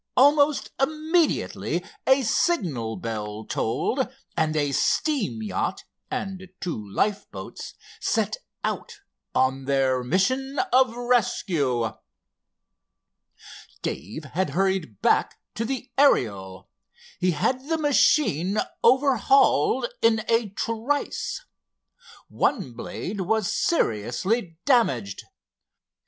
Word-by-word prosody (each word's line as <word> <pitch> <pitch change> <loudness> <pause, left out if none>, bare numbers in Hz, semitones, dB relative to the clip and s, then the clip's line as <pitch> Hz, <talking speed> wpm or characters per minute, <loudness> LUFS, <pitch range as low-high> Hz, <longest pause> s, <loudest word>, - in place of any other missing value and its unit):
Almost 285 +2 +4
immediately 315 +3 0 0.2
a 265 0 +5
signal 170 - 0
bell 110 -1 -5
tolled, 250 - -1 0.3
and 155 -1 +1
a 145 -2 +1
steam 200 - 0
yacht, 100 -3 -2 0.3
and 190 -1 -5
two 110 - -4
lifeboats, 105 - -3 0.2
set - - 0 0.3
out - - -4 0.3
on 130 +1 +1
their 135 -2 +1
mission 260 - 0 0.2
of 255 -2 +4
rescue. 170 - +1 1.9
Dave 105 - -4
had 170 +7 -2
hurried 190 - 0
back - - +2 0.2
to 230 - -2
the 260 +1 -4
Ariel. 100 - +2 0.5
He 180 - +2
had 255 - -1
the 325 - +2
machine 270 - +3 0.3
overhauled 260 - +4 0.2
in 225 -1 +3
a 230 -2 +2
trice. 230 - -2 0.8
One 195 - 0
blade 190 - -5
was 215 +1 0
seriously 165 - 0
damaged. 135 - +1
195 Hz, 90 wpm, -25 LUFS, -, 1.9 s, a